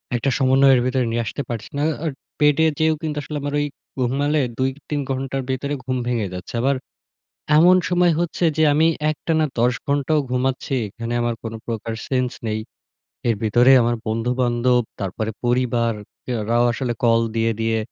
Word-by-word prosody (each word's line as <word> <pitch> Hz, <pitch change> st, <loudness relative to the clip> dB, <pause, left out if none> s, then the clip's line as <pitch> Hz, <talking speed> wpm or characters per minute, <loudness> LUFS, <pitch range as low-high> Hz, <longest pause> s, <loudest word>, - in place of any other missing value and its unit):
একটা 120 Hz, +3 st, 0 dB
সমন্বয়ের 135 Hz, -1 st, +5 dB
ভেতরে 130 Hz, -1 st, +1 dB
নিয়ে 120 Hz, 0 st, 0 dB
আসতে 140 Hz, -, -4 dB
পারছি 115 Hz, -3 st, -5 dB
না। 145 Hz, -, 0 dB
আ -, -, -7 dB
আ -, -, +1 dB, 0.3 s
বেডে 150 Hz, +1 st, +4 dB
যেয়েও 160 Hz, 0 st, +3 dB
কিন্তু 150 Hz, -2 st, -3 dB
আসলে 150 Hz, 0 st, -5 dB
আমার 145 Hz, 0 st, -3 dB
ওই 145 Hz, -, +1 dB, 0.3 s
ঘুমালে 140 Hz, +4 st, +1 dB, 0.2 s
২-৩ 135 Hz, +3 st, -2 dB
ঘণ্টার 135 Hz, 0 st, -2 dB
ভেতরে 140 Hz, +2 st, -2 dB
ঘুম 130 Hz, 0 st, -2 dB
ভেঙে 115 Hz, -4 st, 0 dB
যাচ্ছে। 90 Hz, +4 st, -8 dB
আবার 135 Hz, +2 st, +2 dB, 0.8 s
এমন 175 Hz, +4 st, +7 dB
সময় 180 Hz, -1 st, +3 dB
হচ্ছে 175 Hz, 0 st, -2 dB
যে 160 Hz, -, +4 dB
আমি 160 Hz, +2 st, +4 dB, 0.2 s
একটানা 155 Hz, 0 st, 0 dB
১০ 120 Hz, +1 st, +3 dB
ঘণ্টাও 145 Hz, +2 st, +1 dB
ঘুমাচ্ছি। 130 Hz, +2 st, -1 dB
এখানে 115 Hz, +3 st, -5 dB
আমার 120 Hz, -1 st, 0 dB
কোন 115 Hz, 0 st, -5 dB
প্রকার 115 Hz, 0 st, -3 dB
সেন্স 125 Hz, -2 st, 0 dB, 0.2 s
নেই। 110 Hz, 0 st, -1 dB, 0.7 s
এর 115 Hz, -, +3 dB
ভিতরে 120 Hz, +4 st, +5 dB
আমার 120 Hz, +1 st, +1 dB
বন্ধু-বান্ধব, 120 Hz, +2 st, +1 dB, 0.2 s
তারপরে 105 Hz, +3 st, -3 dB
পরিবার 120 Hz, -1 st, +1 dB, 0.5 s
এরাও 115 Hz, +3 st, +2 dB
আসলে 120 Hz, 0 st, -2 dB
কল 115 Hz, 0 st, +4 dB, 0.2 s
দিয়ে, 115 Hz, 0 st, +2 dB
দিয়ে 115 Hz, 0 st, +1 dB
125 Hz, 165 wpm, -21 LUFS, 115-145 Hz, 0.8 s, এমন